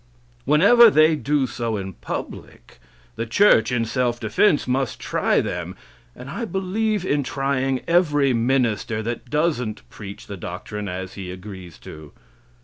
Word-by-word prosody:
Whenever 230 Hz, +9 st, +7 dB
they 155 Hz, -3 st, +4 dB
do 145 Hz, -2 st, 0 dB
so 115 Hz, -3 st, -3 dB
in 95 Hz, -1 st, -6 dB
public, -, -, -8 dB, 0.4 s
the 115 Hz, +1 st, -3 dB
church, 115 Hz, -, +4 dB
in 120 Hz, -2 st, 0 dB
self 120 Hz, 0 st, -1 dB
defense, 145 Hz, -, +2 dB
must 130 Hz, -1 st, -1 dB
try -, -, +1 dB
them; -, -, -5 dB, 0.4 s
and 125 Hz, -, -10 dB
I 185 Hz, -, -5 dB
believe 205 Hz, 0 st, -1 dB
in 145 Hz, -4 st, +1 dB
trying 135 Hz, -1 st, -1 dB
every 150 Hz, -6 st, +3 dB
minister 115 Hz, -3 st, 0 dB
that 120 Hz, +2 st, -5 dB
doesn't 145 Hz, -7 st, -1 dB
preach 100 Hz, -2 st, -9 dB
the 100 Hz, -, -8 dB
doctrine 100 Hz, +4 st, -6 dB
as 95 Hz, +1 st, -6 dB
he 95 Hz, -2 st, -7 dB
agrees 95 Hz, -2 st, -10 dB
to. 75 Hz, -2 st, -11 dB
125 Hz, 140 wpm, -22 LUFS, 105-150 Hz, 0.4 s, Whenever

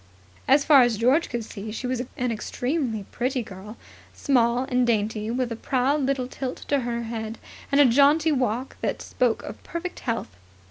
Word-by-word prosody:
As 280 Hz, +2 st, +5 dB
far 285 Hz, -4 st, +7 dB
as 240 Hz, -3 st, +2 dB
George 255 Hz, +9 st, +3 dB
could 235 Hz, -2 st, -3 dB
see 215 Hz, 0 st, -7 dB
she 225 Hz, +4 st, -5 dB
was 250 Hz, -1 st, -1 dB, 0.2 s
an 250 Hz, -1 st, 0 dB
extremely 245 Hz, -1 st, -2 dB
pretty 250 Hz, 0 st, -1 dB
girl, 205 Hz, +2 st, -10 dB, 0.4 s
small 245 Hz, -2 st, +2 dB
and 250 Hz, -2 st, +1 dB
dainty, 215 Hz, -1 st, 0 dB
with 245 Hz, 0 st, -1 dB
a -, -, -2 dB
proud 265 Hz, +5 st, 0 dB
little 270 Hz, -2 st, 0 dB
tilt 255 Hz, 0 st, -6 dB
to 285 Hz, -, +3 dB
her 235 Hz, -1 st, -3 dB
head 225 Hz, -1 st, -5 dB, 0.3 s
and 280 Hz, -, +4 dB
the 290 Hz, -, +8 dB
jaunty 285 Hz, +6 st, +4 dB
walk 255 Hz, -2 st, -1 dB
that -, -, -2 dB
spoke 245 Hz, -3 st, 0 dB
of -, -, -8 dB
perfect 345 Hz, +1 st, -6 dB
health. 230 Hz, -, -3 dB
245 Hz, 180 wpm, -25 LUFS, 230-270 Hz, 0.4 s, the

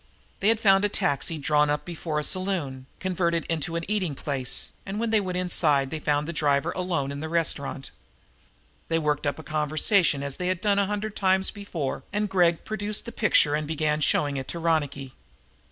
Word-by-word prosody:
They 200 Hz, -, +1 dB
had 225 Hz, 0 st, +5 dB
found 195 Hz, -2 st, +5 dB
a 205 Hz, -, +2 dB
taxi 150 Hz, -2 st, 0 dB
drawn 150 Hz, 0 st, +2 dB
up 150 Hz, 0 st, -1 dB
before 160 Hz, -3 st, -3 dB
a -, -, -3 dB
saloon, 155 Hz, -9 st, -3 dB
converted 170 Hz, -3 st, 0 dB
into 165 Hz, 0 st, -2 dB
an 170 Hz, 0 st, -2 dB
eating 190 Hz, -8 st, 0 dB
place, 135 Hz, -3 st, -1 dB
and 200 Hz, +2 st, -5 dB
when 230 Hz, 0 st, -1 dB
they 220 Hz, -2 st, +4 dB
went 185 Hz, -2 st, -3 dB
inside 150 Hz, -7 st, +2 dB
they 160 Hz, -, -3 dB
found 145 Hz, 0 st, 0 dB
the 170 Hz, -, -4 dB
driver 145 Hz, -3 st, +1 dB
alone 170 Hz, -7 st, -2 dB
in 140 Hz, -, -5 dB
the 160 Hz, +1 st, -4 dB
restaurant. 150 Hz, -5 st, -1 dB, 1.0 s
They 165 Hz, -, +1 dB
worked 150 Hz, -2 st, 0 dB
up 145 Hz, -, 0 dB
the 160 Hz, -, -10 dB
conversation, 155 Hz, +1 st, +2 dB
as 140 Hz, -1 st, -4 dB
they 180 Hz, -, -2 dB
had 185 Hz, -1 st, 0 dB
done 200 Hz, 0 st, +2 dB
a 200 Hz, -, +2 dB
hundred 210 Hz, +1 st, -3 dB
times 190 Hz, 0 st, +2 dB
before. 180 Hz, -9 st, -4 dB, 0.3 s
Gregg 175 Hz, -3 st, +2 dB
produced 210 Hz, 0 st, -3 dB
the 235 Hz, -, -6 dB
picture 195 Hz, -9 st, +3 dB
and 150 Hz, 0 st, -1 dB
began 155 Hz, -1 st, 0 dB
showing 145 Hz, -1 st, +1 dB
it 130 Hz, -, -5 dB
to -, -, -4 dB
Ronicky. 145 Hz, -5 st, -1 dB
165 Hz, 195 wpm, -26 LUFS, 145-190 Hz, 1.0 s, had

